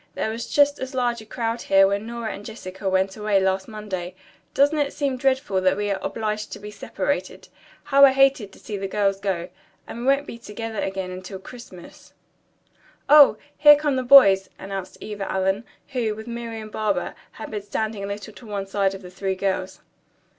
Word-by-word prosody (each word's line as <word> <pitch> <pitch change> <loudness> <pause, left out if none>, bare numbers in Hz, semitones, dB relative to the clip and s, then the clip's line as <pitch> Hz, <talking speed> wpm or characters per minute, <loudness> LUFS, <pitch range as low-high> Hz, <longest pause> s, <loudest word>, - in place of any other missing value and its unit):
"There 220 - -1
was 230 +1 -5
just 285 0 +3
as 260 +1 -6
large 240 -2 0
a 220 - -14
crowd 230 0 -3
here 195 0 +5
when 200 +2 -1
Nora 235 -1 -4
and 200 - -9
Jessica 195 -3 -6
went 190 0 +1
away 210 -2 +1
last 190 0 0
Monday. 190 -5 -6 0.4
Doesn't 290 +2 +3
it 285 -1 0
seem 280 -3 -1
dreadful 260 -7 0
that 185 +1 +2
we 205 0 -1
are 195 - -1
obliged 215 -1 -3
to - - -7
be 210 +1 -9
separated? - - -4 0.3
How 280 -1 +4
I 270 - +6
hated 270 -6 +3
to - - -16
see 210 - -6
the 195 0 -3
girls 195 -1 0
go. 185 -3 -2 0.4
And 230 - -8
we 240 - -5
won't 275 +1 +3
be 235 - -9
together 225 -1 -6
again 190 -1 -3
until 185 +1 -7
Christmas." 190 -3 -13 1.0
"Oh, 295 -1 +8 0.2
here 295 -1 +9
come 290 -1 0
the 260 - 0
boys!" 240 -8 +7
announced 195 -1 -6
Eva 205 -2 -5
Allen, 190 +3 0 0.2
who, 235 -5 -1
with 220 +1 -9
Marian 230 -2 -6
Barber, 215 -1 -1 0.2
had - - -8
been 210 -1 -3
standing 215 0 -3
a - - -3
little 205 +1 -6
to 240 - -14
one 200 -2 -3
side 195 0 0
of 195 - -11
the 180 - -10
three 190 +1 -2
girls. 190 -1 -2
210 Hz, 195 wpm, -23 LUFS, 195-235 Hz, 1.0 s, here